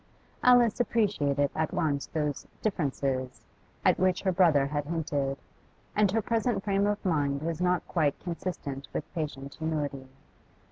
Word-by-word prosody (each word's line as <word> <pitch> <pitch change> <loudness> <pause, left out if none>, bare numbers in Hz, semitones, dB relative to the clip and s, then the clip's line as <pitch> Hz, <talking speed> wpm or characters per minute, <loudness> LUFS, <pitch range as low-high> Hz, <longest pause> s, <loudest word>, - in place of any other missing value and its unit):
Alice 245 -3 +5
appreciated 150 - +1
at 155 0 -1
once 150 -5 0
those 150 -3 -2 0.2
'differences' 135 -9 -1 0.4
at - - +4
which 185 -1 +2
her 190 - +2
brother 165 -7 +4
had 145 +1 -2
hinted, 145 -4 -1 0.6
and 210 -1 +4
her 225 +1 +1
present 230 -3 0
frame 200 0 +2
of 205 0 -2
mind 145 -5 +1
was 165 +1 -2
not 180 0 +1
quite 150 -5 +1
consistent 165 -6 -5
with - - -5
patient 140 -4 -4
humility. 150 -4 -3
160 Hz, 140 wpm, -29 LUFS, 140-195 Hz, 0.6 s, Alice